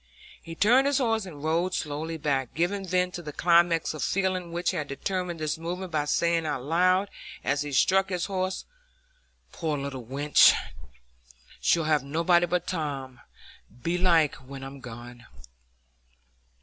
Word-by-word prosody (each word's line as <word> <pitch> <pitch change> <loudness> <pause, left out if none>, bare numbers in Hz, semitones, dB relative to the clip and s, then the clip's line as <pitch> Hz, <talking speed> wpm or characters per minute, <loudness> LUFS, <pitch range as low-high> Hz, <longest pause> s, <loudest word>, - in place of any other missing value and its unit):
He 165 - -9
turned 245 +9 +4
his 285 -1 +2
horse, 225 -6 0
and 150 -5 -10
rode 170 +4 0
slowly 155 +2 -3
back, 135 -4 -1
giving 190 +4 -1
vent 180 0 +1
to 175 - -5
the 150 -3 -7
climax 170 0 +3
of 155 - -6
feeling 185 -2 -1
which 175 +1 0
had 155 -6 -3
determined 175 +4 -3
this 155 0 -2
movement 180 +2 -5
by 150 -2 0
saying 170 +2 +1
aloud, 170 +7 +1 0.4
as 140 +1 0
he 145 0 -4
struck 190 +7 +3
his 180 -2 -1
horse, 185 -1 -3 0.9
"Poor 155 -3 -2
little 140 -2 -5
wench! 140 +5 +5 1.0
she'll 165 - +2
have 155 -2 +2
nobody 170 +5 +2
but 175 0 -1
Tom, 140 -7 -4 0.6
belike, 170 -3 +3
when 135 +1 -10
I'm 135 +1 -8
gone." 120 -1 -10
165 Hz, 145 wpm, -27 LUFS, 145-180 Hz, 1.0 s, wench